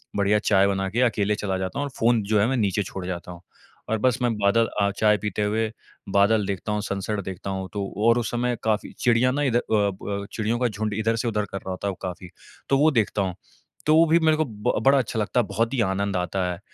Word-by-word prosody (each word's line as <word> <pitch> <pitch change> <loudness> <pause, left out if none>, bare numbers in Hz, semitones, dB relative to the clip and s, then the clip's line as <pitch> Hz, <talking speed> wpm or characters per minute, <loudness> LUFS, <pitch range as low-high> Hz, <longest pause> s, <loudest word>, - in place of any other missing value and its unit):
बढ़िया 100 +1 +2
चाय 100 -2 +3
बना 95 -1 -1
के 115 +5 0
अकेले 105 -4 +2
चला 95 -2 -2
जाता 95 +7 -3
हूँ - - 0
और - - -5
फ़ोन 115 0 +3
जो 105 +1 +1
है 100 - +4
मैं 130 - 0
नीचे 105 -2 +1
छोड़ 95 -1 -7
जाता 90 -1 -5
हूँ। 85 0 -11 0.5
और 110 - +1
बस 125 0 +3
मैं 120 -2 +2
बादल 105 +3 +3
अ, 100 - +3
चाय 105 -1 +4
पीते 105 +1 -2
हुए, 110 +1 0 0.4
बादल 100 +2 +3
देखता 100 +1 -3
हूँ, 105 0 -1
सनसेट 100 +1 -3
देखता 95 +1 -6
हूँ 95 -1 -4
तो 100 -1 -2 0.2
और 115 +1 +5
उस 120 - -3
समय 120 0 -1
काफ़ी 110 -1 0
चिड़ियाँ 125 +1 +3
ना 145 +1 0
इध 125 -4 +1
अ, - - +2
ब 100 -1 -1
चिड़ियों 115 +2 -1
का 125 - +2
झुंड 105 0 -3
इधर 115 +1 +1
से 115 +1 -2
उधर 105 -2 0
कर 95 - -3
रहा 95 - -7
होता 95 +2 -4
है - - 0
वो - - -10
काफ़ी, 90 -1 -6 0.4
तो 135 - +4
वो 155 +3 +4
देखता 110 -4 +1
हूँ, 90 -2 -3 0.5
तो 155 - +4
वो 165 +1 +6
भी 165 +2 +4
मेरे 155 -1 +3
को 155 - +1
ब 105 -3 -2
बड़ा 140 +1 +6
अच्छा 115 -2 -2
लगता 105 +3 0
है, 120 - +2
बहुत 115 +5 -1
ही 125 - +1
आनंद 100 -1 0
आता 90 +1 -1
है। 85 - -6
105 Hz, 260 wpm, -24 LUFS, 100-115 Hz, 0.5 s, वो